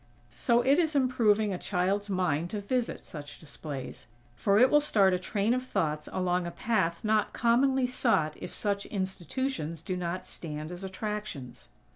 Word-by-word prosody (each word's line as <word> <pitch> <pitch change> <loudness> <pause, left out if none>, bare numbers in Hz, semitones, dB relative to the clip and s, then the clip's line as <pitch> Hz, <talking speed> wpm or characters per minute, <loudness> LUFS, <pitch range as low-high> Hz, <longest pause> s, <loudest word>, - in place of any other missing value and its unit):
So 235 0 +2
it 280 +5 +4
is 320 -3 +1
improving 220 -6 +3
a 180 - -4
child's 195 +2 0
mind 175 -4 0
to 210 - -3
visit 240 +4 -2
such 145 -2 -8
displays; 145 -5 -8 0.3
for 200 0 +2
it 255 +4 +6
will 295 - +7
start 200 -10 +4
a 180 - +1
train 205 +4 0
of 255 0 -1
thoughts 155 -11 -1
along 180 -1 0
a - - -2
path 170 -4 0
not 215 -1 +2
commonly 255 +3 +3
sought 225 - +1
if - - -6
such 200 -1 -2
institutions 190 - -3
do 185 - -2
not 180 0 -3
stand 155 0 -6
as 180 +2 -7
attractions. 190 - -5
200 Hz, 165 wpm, -29 LUFS, 170-235 Hz, 0.3 s, will